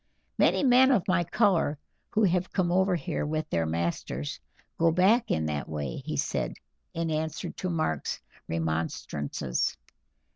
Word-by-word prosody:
"Many -, -, +4 dB
men 260 Hz, 0 st, +6 dB
of 230 Hz, -10 st, +2 dB
my 185 Hz, -2 st, +3 dB
color 175 Hz, -5 st, +2 dB, 0.3 s
who 220 Hz, -, +1 dB
have 180 Hz, -1 st, +2 dB
come 180 Hz, -3 st, +1 dB
over 190 Hz, +1 st, +3 dB
here 170 Hz, -1 st, -2 dB
with 155 Hz, +1 st, -2 dB
their 80 Hz, -1 st, +1 dB
masters 80 Hz, -4 st, -2 dB, 0.4 s
go 165 Hz, 0 st, +5 dB
back 195 Hz, +8 st, +4 dB
in 80 Hz, -, +1 dB
that 75 Hz, -2 st, -3 dB
way," 75 Hz, -5 st, -3 dB
he -, -, -4 dB
said, -, -, -1 dB, 0.4 s
in 165 Hz, -1 st, -1 dB
answer 155 Hz, 0 st, -2 dB
to 185 Hz, -, -4 dB
Mark's 155 Hz, -, -1 dB, 0.3 s
remonstrances. 80 Hz, -5 st, -2 dB
160 Hz, 145 wpm, -28 LUFS, -, 0.4 s, men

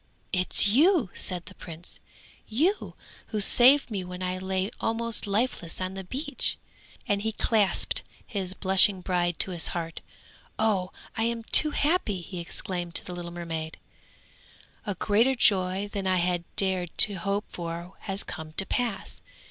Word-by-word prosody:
'It 185 Hz, -1 st, 0 dB
is -, -, +9 dB
you,' 280 Hz, -, +3 dB
said 180 Hz, -2 st, -1 dB
the -, -, -11 dB
prince, 170 Hz, 0 st, -6 dB, 0.5 s
'you 330 Hz, -, 0 dB, 0.3 s
who 215 Hz, -, -3 dB
saved 250 Hz, +6 st, +5 dB
me 195 Hz, -3 st, -3 dB
when 180 Hz, 0 st, -7 dB
I 185 Hz, 0 st, -2 dB
lay 190 Hz, +1 st, -2 dB
almost 230 Hz, -1 st, -1 dB
lifeless 200 Hz, -5 st, -1 dB
on 185 Hz, 0 st, -3 dB
the 195 Hz, 0 st, -6 dB
beach?' 285 Hz, -, -2 dB, 0.5 s
and 200 Hz, 0 st, 0 dB
he 220 Hz, +1 st, -1 dB
clasped 210 Hz, -3 st, +2 dB, 0.2 s
his 190 Hz, -4 st, -3 dB
blushing 190 Hz, 0 st, +5 dB
bride 175 Hz, -2 st, -1 dB
to 190 Hz, -, +3 dB
his 170 Hz, -2 st, +2 dB
heart. 165 Hz, -1 st, -5 dB, 0.6 s
'Oh! 195 Hz, -4 st, 0 dB, 0.2 s
I 225 Hz, -1 st, 0 dB
am 230 Hz, 0 st, -2 dB
too 305 Hz, +6 st, +5 dB
happy!' 290 Hz, -, 0 dB
he 180 Hz, +1 st, -7 dB
exclaimed 175 Hz, 0 st, -5 dB
to -, -, +2 dB
the 180 Hz, -, -6 dB
little 175 Hz, -1 st, -6 dB
mermaid. 165 Hz, -2 st, -6 dB, 1.1 s
'A 205 Hz, -, -2 dB
greater 225 Hz, +8 st, +2 dB
joy 190 Hz, -3 st, +2 dB
than 195 Hz, -2 st, -2 dB
I 185 Hz, 0 st, +2 dB
had 175 Hz, -1 st, 0 dB
dared 185 Hz, -3 st, 0 dB
to 205 Hz, -, -8 dB
hope 200 Hz, +4 st, -2 dB
for 170 Hz, +1 st, -6 dB
has 195 Hz, 0 st, -5 dB
come 155 Hz, -1 st, -8 dB
to 195 Hz, -, +4 dB
pass. 235 Hz, -3 st, -2 dB
190 Hz, 160 wpm, -27 LUFS, 180-220 Hz, 1.1 s, is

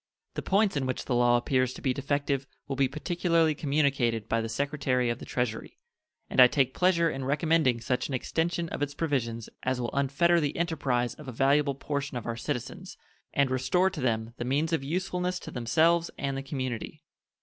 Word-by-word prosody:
The -, -, -3 dB
points 200 Hz, -1 st, +2 dB
in 135 Hz, -2 st, 0 dB
which 130 Hz, -, -3 dB
the 130 Hz, -, -1 dB
law 120 Hz, 0 st, +4 dB
appears 130 Hz, +1 st, +1 dB
to -, -, -10 dB
be 130 Hz, -, +2 dB
defective 140 Hz, 0 st, -1 dB, 0.2 s
will 135 Hz, -, -3 dB
be 135 Hz, 0 st, +3 dB
particularly 165 Hz, +2 st, +1 dB
communicated 140 Hz, -7 st, 0 dB
by 115 Hz, 0 st, +1 dB
the 115 Hz, -, -4 dB
Secretary 130 Hz, -1 st, 0 dB
of 120 Hz, -, -4 dB
the -, -, -8 dB
Treasury, 120 Hz, -3 st, -3 dB, 0.5 s
and -, -, +4 dB
I 125 Hz, -, +10 dB
take 130 Hz, 0 st, +1 dB
pleasure 180 Hz, -2 st, +3 dB
in 135 Hz, -4 st, -3 dB
recommending 150 Hz, -2 st, +2 dB
such 125 Hz, +2 st, -1 dB
an 135 Hz, -, -2 dB
extension 170 Hz, +6 st, -1 dB
of -, -, -5 dB
its 145 Hz, 0 st, -2 dB
provisions 115 Hz, -8 st, -2 dB
as 130 Hz, 0 st, -1 dB
will 120 Hz, -1 st, -2 dB
unfetter 140 Hz, +5 st, +2 dB
the 145 Hz, -2 st, -2 dB
enterprise 135 Hz, -8 st, 0 dB
of 150 Hz, -, -12 dB
a -, -, -4 dB
valuable 140 Hz, +3 st, +2 dB
portion 140 Hz, -1 st, -3 dB
of 120 Hz, -, -6 dB
our 115 Hz, -, -2 dB
citizens 120 Hz, +1 st, -5 dB, 0.3 s
and 140 Hz, -2 st, +2 dB
restore 180 Hz, +9 st, +2 dB
to 165 Hz, -5 st, -6 dB
them 115 Hz, -2 st, -1 dB
the -, -, -3 dB
means 145 Hz, +6 st, 0 dB
of 155 Hz, -4 st, 0 dB
usefulness 180 Hz, +3 st, -2 dB
to -, -, -8 dB
themselves 165 Hz, +8 st, +2 dB
and 135 Hz, -1 st, -2 dB
the 135 Hz, -, -3 dB
community. 135 Hz, +2 st, -5 dB
140 Hz, 195 wpm, -28 LUFS, 125-160 Hz, 0.5 s, I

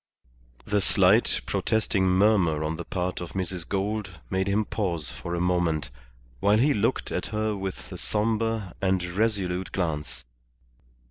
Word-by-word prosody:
The 105 Hz, -1 st, +1 dB
slight, -, -, +4 dB
protesting 105 Hz, -3 st, +1 dB
murmur 90 Hz, -5 st, +3 dB
on 80 Hz, +1 st, -2 dB
the 85 Hz, -, -5 dB
part 90 Hz, +1 st, -3 dB
of 85 Hz, -2 st, -7 dB
Mrs. 90 Hz, -2 st, -3 dB
Gould 100 Hz, -2 st, -2 dB
made 95 Hz, 0 st, 0 dB
him 105 Hz, +2 st, +1 dB
pause 85 Hz, -10 st, -2 dB
for 85 Hz, 0 st, -5 dB
a -, -, -1 dB
moment, 85 Hz, -6 st, 0 dB, 0.5 s
while 105 Hz, -, +4 dB
he 140 Hz, +6 st, +4 dB
looked 105 Hz, -, 0 dB
at -, -, -2 dB
her 110 Hz, 0 st, -1 dB
with 95 Hz, -1 st, -6 dB
a -, -, -6 dB
sombre 110 Hz, -2 st, -1 dB
and 95 Hz, -2 st, +1 dB
resolute 95 Hz, -1 st, -1 dB
glance. 80 Hz, -8 st, -3 dB
95 Hz, 145 wpm, -26 LUFS, 90-105 Hz, 0.5 s, slight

